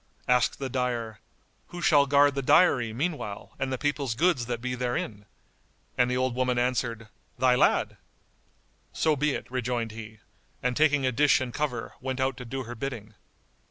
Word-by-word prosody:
Asked 125 -1 +2
the 135 - -3
dyer, 120 -4 -2 0.5
"Who 175 - -8
shall 145 -4 +4
guard 145 0 +5
the 140 - -2
dyery 125 -5 +4
meanwhile 130 - -4
and 135 -1 -2
the 130 - -1
people's 140 -4 -1
goods 155 -6 +2
that 120 -1 -2
be 125 +1 -3
therein?"; 120 -4 -3 0.7
and 125 0 +2
the 125 - 0
old 130 -1 0
woman 125 0 0
answered, 120 -2 -1 0.3
"Thy 125 +1 +4
lad!" 125 - +2 1.0
"So 155 -2 +2
be 145 0 0
it," - - -5
rejoined 120 -2 -2
he, 110 0 -9 0.5
and 125 0 0
taking 145 -2 +3
a 130 - +2
dish 145 +4 +4
and 130 -3 -4
cover, 130 -6 -3
went 130 0 -3
out 130 0 0
to 125 - -8
do 130 +2 -4
her 120 0 -7
bidding. 115 -3 -6
125 Hz, 175 wpm, -27 LUFS, 120-140 Hz, 1.0 s, guard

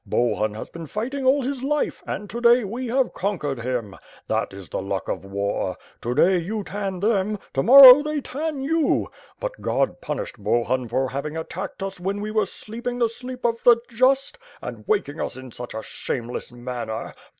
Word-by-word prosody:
Bohun 110 -3 0
has 110 - -6
been 165 -1 -8
fighting 260 - -3
all 275 +1 +4
his 265 0 -3
life, 295 +2 -1
and 205 - -4
to 235 +4 -6
day 240 +1 +6
we 240 +5 -4
have 255 +2 +1
conquered 165 - -2
him. 115 -4 -3 0.3
That - - 0
is 95 -1 -10
the - - -3
luck 95 0 -3
of - - -3
war. 100 -1 -2 0.2
To 120 +2 -2
day 185 +4 +4
you 205 +5 -3
tan 195 -2 -4
them; 210 -1 +1 0.2
to 135 - +1
morrow 265 - +11
they 300 0 -2
tan 290 +1 -4
you. 320 +2 +1 0.3
But - - -5
God - - 0
punished - - -4
Bohun 120 +1 +1
for 130 +3 0
having 140 +4 -4
attacked 185 +4 -5
us 195 -1 -5
when 195 +3 -2
we 210 +1 -4
were 215 0 +1
sleeping 240 +3 -6
the 235 -2 +2
sleep 250 +2 -8
of 230 -1 +1
the 240 -1 +7
just, 265 - +2 0.2
and - - -7
waking 400 - 0
us - - -4
in 130 -1 -9
such 120 0 -8
a 110 - -4
shameless 120 0 -5
manner. 120 -2 -5
205 Hz, 190 wpm, -24 LUFS, -, 0.3 s, morrow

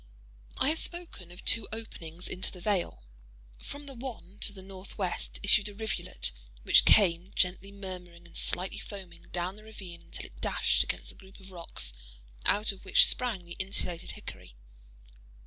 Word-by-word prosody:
I 270 - +3
have 320 +1 +1
spoken 340 - -2
of 180 - -10
two 230 -2 +4
openings 180 -6 -5
into 180 - -1
the 185 - -10
vale. 175 - 0 0.6
From 285 0 -6
the 275 - -7
one 230 -6 -7
to - - +4
the 195 -2 -10
northwest 190 0 -4
issued 205 +1 +5
a 205 - -11
rivulet, 220 - -3 0.3
which - - +7
came, 180 -2 +6
gently 185 +2 +2
murmuring 180 -3 -8
and 170 - -16
slightly 185 +1 +2
foaming, 185 -5 -8
down 180 +3 -2
the 215 - -12
ravine, 190 -6 -9
until - - -4
it - - -13
dashed - - +3
against - - -3
the - - -7
group 190 +1 -16
of 190 0 -12
rocks 170 - -3 0.5
out 210 +1 +5
of 195 - -11
which 190 - +7
sprang 225 -8 +1
the 170 0 -6
insulated 185 -3 0
hickory. - - -9
190 Hz, 165 wpm, -31 LUFS, 175-210 Hz, 0.6 s, which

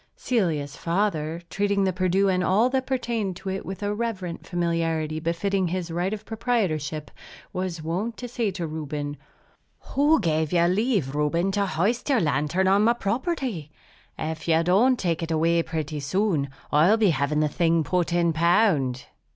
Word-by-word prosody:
Celia's 160 - -1
father, 170 -3 -1
treating 200 0 +1
the 190 -1 +1
Perdu 185 +2 +2
and 185 -1 +1
all 215 +8 +3
that 260 -1 0
pertained 235 -7 -1
to 190 +2 -6
it 190 0 -3
with 190 +2 -6
a 205 0 0
reverent 205 -6 -4
familiarity 165 -3 -1
befitting 180 +4 0
his 175 -1 -3
right 175 +3 -1
of 215 0 -5
proprietorship, 180 - -1 0.4
was 180 -3 -3
wont 190 +9 -2
to 245 - -6
say 235 -3 -1
to 180 -3 -4
Reuben, 150 -2 -4 0.8
"Who 295 +3 +4
gave 160 -4 0
you 175 -1 +3
leave, 185 - +1
Reuben, 165 +6 +1
to 200 0 0
hoist 205 - 0
your 265 -4 +4
lantern 150 +3 +1
on 200 +2 +4
my 235 +2 +5
property? 240 - -2 0.5
If 160 +1 -4
you 165 0 +3
don't 220 +9 +4
take 170 -5 -1
it 165 - -3
away 165 +1 +2
pretty 155 -2 -4
soon, 155 -1 0 0.2
I'll 165 +9 +5
be 210 -5 +4
having 145 +1 0
the 155 - +3
thing 165 +1 +1
put 175 +4 0
in 170 -1 +2
pound." 160 - +2
175 Hz, 165 wpm, -25 LUFS, 160-205 Hz, 0.8 s, my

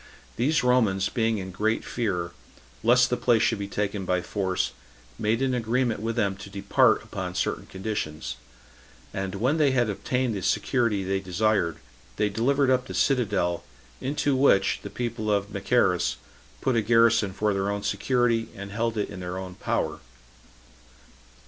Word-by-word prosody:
These 145 +5 +1
Romans 110 -6 +3
being 115 -2 0
in 95 -1 -5
great 110 +5 0
fear, 90 -8 -2 0.5
lest 125 +3 +4
the 125 - +1
place 120 -2 +3
should 115 - +1
be 100 - -3
taken 100 0 -2
by 90 -1 0
force, 95 -3 -1 0.5
made 115 +4 +1
an 130 -1 +1
agreement 120 -1 0
with 115 +2 -2
them 100 -1 +1
to 100 0 -10
depart 100 0 +3
upon 90 -1 -5
certain - - -2
conditions; 80 - -4 0.8
and 95 0 -3
when 125 +10 +1
they 150 -3 +4
had 120 -4 +2
obtained 125 +4 -1
the 95 - -3
security 115 -2 +1
they 95 +1 0
desired, 95 -2 0 0.4
they 105 0 +1
delivered 130 +6 +2
up 125 -1 +1
the - - -6
citadel, 105 - +1 0.4
into 140 0 0
which 130 -8 +3
the - - -7
people 115 -3 -3
of 100 0 0
Machaerus 100 -4 +2 0.5
put 130 - +1
a 115 - +3
garrison 115 -2 +4
for 105 +2 0
their 100 0 -1
own 100 0 -2
security, 115 +3 +1
and 100 0 -7
held 115 +1 -1
it 105 - 0
in 90 - -7
their 90 0 -5
own 95 -1 -6
power. - - -2
105 Hz, 160 wpm, -26 LUFS, 95-120 Hz, 0.8 s, lest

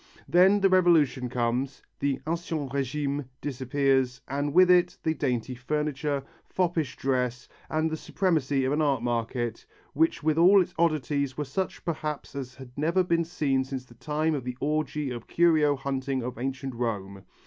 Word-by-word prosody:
then, 190 +4 +5
the 195 - +6
Revolution 160 -9 +3
comes, 125 +2 -1 0.2
the 140 -1 0
ancien 165 -2 -2
régime 140 +2 -2 0.2
disappears 130 -1 0
and 145 +2 -1
with 180 +3 +6
it 180 -1 +4
the 160 - +1
dainty 125 -5 -2
furniture, 145 +2 -2 0.2
foppish 170 -7 -1
dress, 125 -2 -1 0.2
and 155 0 +1
the - - -1
supremacy 155 -6 0
of 135 - +1
an 155 - +1
art 140 -5 +1
market 120 -1 -2 0.3
which 160 +1 +1
with 155 +1 +2
all 190 +4 +7
its 180 - 0
oddities 145 -4 0
were 150 - -2
such 185 +8 -4
perhaps 155 -3 -4
as 130 -2 -6
had 130 -2 -11
never 165 +6 +2
been 170 -1 +1
seen 145 -6 0
since 130 -1 -6
the 120 - -17
time 155 +5 -1
of 140 -4 -2
the 125 0 -5
orgy 150 -1 -1
of 120 -2 -7
curio 155 -4 +3
hunting 135 -1 -2
of 125 -1 -5
Ancient 135 +1 -3
Rome. 100 -5 -3
140 Hz, 165 wpm, -27 LUFS, 130-160 Hz, 0.3 s, all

